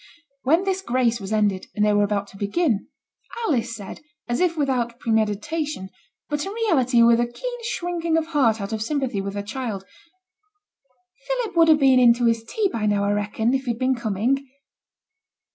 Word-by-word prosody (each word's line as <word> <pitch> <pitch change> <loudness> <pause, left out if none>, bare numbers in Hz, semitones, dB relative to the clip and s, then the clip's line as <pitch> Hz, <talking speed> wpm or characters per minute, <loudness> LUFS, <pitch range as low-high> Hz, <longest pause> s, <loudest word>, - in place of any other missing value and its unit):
When 325 +8 +3
this 385 -1 -1
grace 240 -6 +1
was 195 +1 -6
ended, 205 -3 +1
and 210 - +2
they 210 - +3
were 205 - +3
about 205 -1 -1
to - - -16
begin, 215 - 0 0.6
Alice 240 - 0
said, 200 -3 -8 0.3
as 240 - -1
if 350 -2 +1
without 250 -5 0
premeditation, 220 +2 -1 0.4
but 295 0 -2
in 390 - -5
reality 270 - +3
with 235 0 +5
a 240 - +1
keen 485 - -6
shrinking 345 -7 -1
of 325 - 0
heart 270 -9 +2
out 200 +2 -4
of 220 - -3
sympathy 260 -4 -1
with 195 +1 -5
her 200 - -3
child 210 -3 -5 1.4
'Philip - - -2
would 330 -1 +5
have 310 -1 +6
been 265 -2 +5
in 240 -2 +6
to 240 0 0
his 230 -1 +2
tea 410 - 0
by 225 - -2
now, 205 -1 +1
I 200 - +1
reckon, 210 +3 0
if 265 0 -1
he'd 235 -2 -1
been 260 +1 +1
coming.' 235 +3 -1
240 Hz, 185 wpm, -23 LUFS, 210-310 Hz, 1.4 s, have